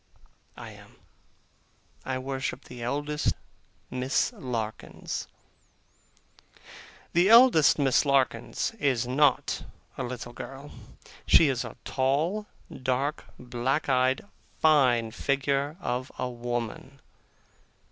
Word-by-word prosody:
I - - -8
am. - - -16 1.1
I 130 -1 -2
worship 130 0 -4
the 125 -1 -10
eldest 145 +5 -1 0.6
Miss 130 +1 0
Larkins. 115 -4 -5 1.9
The 175 +3 +4
eldest 230 - +7
Miss 135 -3 +3
Larkins 135 -4 0
is 130 -4 +1
not 135 +1 +2 0.4
a - - -1
little 120 -1 -6
girl. 135 +3 -9 0.6
She 155 - +6
is 130 -2 -1
a - - -9
tall, 155 +11 0 0.3
dark, 130 +3 -2
black 125 +4 -2
eyed, 130 +3 +2 0.3
fine 125 -8 +4
figure 140 +4 -1
of 125 -5 -3
a - - -2
woman. 120 +2 -5
130 Hz, 95 wpm, -27 LUFS, 125-145 Hz, 1.9 s, eldest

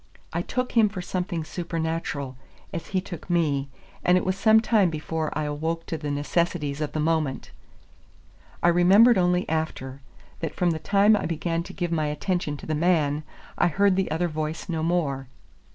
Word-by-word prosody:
I - - 0
took 250 0 -2
him 225 -3 +4
for 200 -2 -6
something 180 -2 -2
supernatural, 160 -5 -3 0.4
as 165 - -5
he 190 -1 0
took 175 -2 -9
me, 145 -5 +1 0.3
and 180 +1 +5
it - - -1
was 185 0 +1
some 220 +3 +5
time 220 -4 +3
before 155 0 -3
I 155 - 0
awoke 160 +3 -2
to - - -3
the 150 -1 -4
necessities 150 0 -1
of 150 - -3
the 155 - -1
moment. 155 -3 -1 1.1
I 175 - +6
remembered 190 +6 +6
only 180 0 +2
after, 140 -4 -3 0.4
that 165 - -4
from 180 -2 +2
the 160 - -2
time 205 +5 +4
I - - -1
began 165 +1 -1
to 170 - -9
give 175 -2 -3
my 155 -2 +1
attention 150 0 -2
to - - -10
the 155 - -2
man, 155 -2 +2 0.4
I - - +5
heard 200 +3 +3
the 190 0 0
other 165 +3 0
voice 155 +1 -4
no 165 -3 -2
more. 155 -6 0
165 Hz, 185 wpm, -25 LUFS, 155-180 Hz, 1.1 s, I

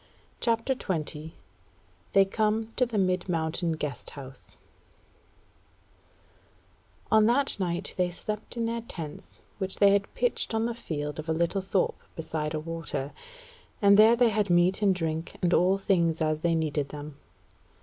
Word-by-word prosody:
CHAPTER 230 +2 +1
20 160 - -4 0.8
They 195 0 +6
Come 220 +2 -1
to 250 - +2
the 230 -2 -3
Mid 185 -1 +1
Mountain 165 0 0
Guest 150 -4 -4
House 135 -2 -10 2.5
On 220 0 +6
that 270 +4 +3
night 175 0 0
they 180 -1 +2
slept 210 +6 -6
in 230 - 0
their 230 0 -2
tents 165 -10 -8 0.2
which 190 -1 -2
they 200 -1 +5
had 200 0 +1
pitched 245 -2 0
on 220 +1 +1
the 235 - -1
field 150 -10 -5
of 155 +1 -6
a - - +2
little 170 +4 0
thorp 190 0 0 0.2
beside 155 -1 -3
a - - -1
water; 160 -3 -4 0.7
and 200 -2 +6
there 220 +3 +7
they 240 0 +4
had 210 -2 0
meat 175 +3 +3
and 195 -2 +3
drink 160 -1 -3
and 175 -1 +1
all 185 +3 +4
things 170 -5 +1
as 155 -1 0
they 170 0 +2
needed 150 -3 -1
them. 145 -1 -8
180 Hz, 155 wpm, -28 LUFS, 160-215 Hz, 2.5 s, there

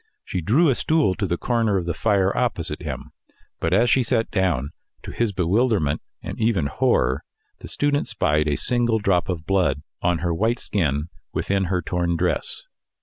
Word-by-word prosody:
She 90 - -3
drew 135 - +3
a 140 - +4
stool 155 -5 +2
to 100 0 -2
the 85 0 -1
corner 115 -3 +1
of 90 - -2
the 85 - -1
fire 100 0 +1
opposite 110 -10 -1
him. - - -6 0.5
But 85 - -1
as 115 +6 +4
she 130 +3 +4
sat 115 -2 0
down, 85 -9 0 0.3
to - - -7
his 115 -3 0
bewilderment, 95 - +1 0.2
and - - -6
even 110 -9 +1
horror, 70 -1 +1 0.4
the - - -9
student 145 0 0
spied 75 +1 +1
a 75 - +1
single 120 -2 +2
drop 95 -4 +1
of 80 -4 -3
blood 85 -7 +1 0.2
on 85 -1 +2
her 85 - +1
white 110 +8 +1
skin 75 -8 -1 0.2
within 100 -1 0
her 90 -1 -1
torn 85 0 -1
dress. - - -1
95 Hz, 180 wpm, -23 LUFS, 85-115 Hz, 0.5 s, a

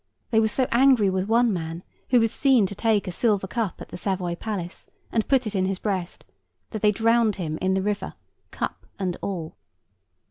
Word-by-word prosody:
They 220 - +4
were 220 - +3
so 255 +5 +1
angry 240 -5 +5
with 185 +1 -1
one 230 0 +3
man, 165 0 -4 0.3
who 250 - +5
was 225 -1 +2
seen 265 -7 +4
to 190 - -4
take 215 -1 +1
a - - -2
silver 205 0 +1
cup 210 -1 -3
at - - -9
the - - -7
Savoy 180 -2 -1
Palace, 180 -2 -5 0.2
and 225 -2 0
put 265 -3 +3
it 215 - -3
in 190 -2 +1
his 190 0 -1
breast, 185 -4 -3 0.5
that 215 - -4
they 210 - +5
drowned 225 0 +3
him 160 -5 -4
in 190 0 +2
the 190 - 0
river, 205 0 -2 0.3
cup - - -5
and 185 -3 -2
all. 170 -5 -4
205 Hz, 205 wpm, -25 LUFS, 185-225 Hz, 0.5 s, angry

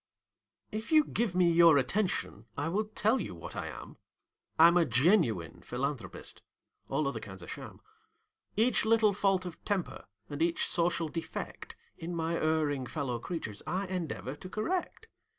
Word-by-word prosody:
If 220 +5 -5
you 310 -1 +7
give 225 -9 -1
me 180 -2 +4
your 165 -2 +7
attention, 185 +9 -1
I 145 +3 -1
will 210 +5 0
tell 220 +3 +1
you - - -5
what 85 - -8
I - - -3
am: - - -9 0.6
I'm 170 +2 +8
a 175 - +6
genuine 125 - +2
philanthropist 130 +1 -4 0.5
all 155 - +1
other 120 -5 -2
kinds 95 -4 -9
are - - -10
sham. - - -8 0.8
Each 230 +2 +4
little 220 -2 +4
fault 195 -2 +1
of 175 - -8
temper 200 -4 -2 0.2
and 145 +1 -6
each 170 0 +2
social 170 -1 +2
defect 165 +1 -6 0.2
In 170 +1 -4
my 165 0 -1
erring 155 -5 +1
fellow 130 -6 -3
creatures, 115 - -5
I 190 +2 -1
endeavor 170 -7 -4
to 185 - -9
correct. 340 - -2
170 Hz, 155 wpm, -31 LUFS, 145-200 Hz, 0.8 s, I'm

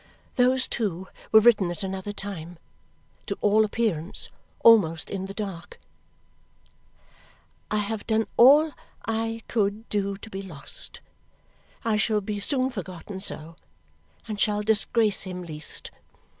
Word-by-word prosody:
Those, 255 +1 +3
too, 190 -5 -3 0.2
were 220 - +8
written 210 -5 +5
at 175 +4 -5
another 190 +1 -4
time. 180 -4 -7 0.7
To - - -3
all 210 +1 +4
appearance, 205 -6 -1 0.3
almost 170 -9 +5
in 190 -1 -3
the 195 - -7
dark: 195 -5 -6 1.9
I 215 - 0
have 210 +1 -3
done 220 0 +2
all 290 +6 +7 0.3
I 225 0 -2
could 215 0 0
do 200 -1 -1
to 220 - -11
be 195 - -4
lost. 165 -8 -9 0.8
I 220 -2 +2
shall 215 0 +2
be 205 +1 -4
soon 260 +5 +1
forgotten 190 -2 -7
so, 165 -3 -1 0.7
and 210 -2 -4
shall 210 0 +1
disgrace 220 0 +3
him 180 -2 -6
least. 155 -3 -5
205 Hz, 130 wpm, -26 LUFS, 190-225 Hz, 1.9 s, were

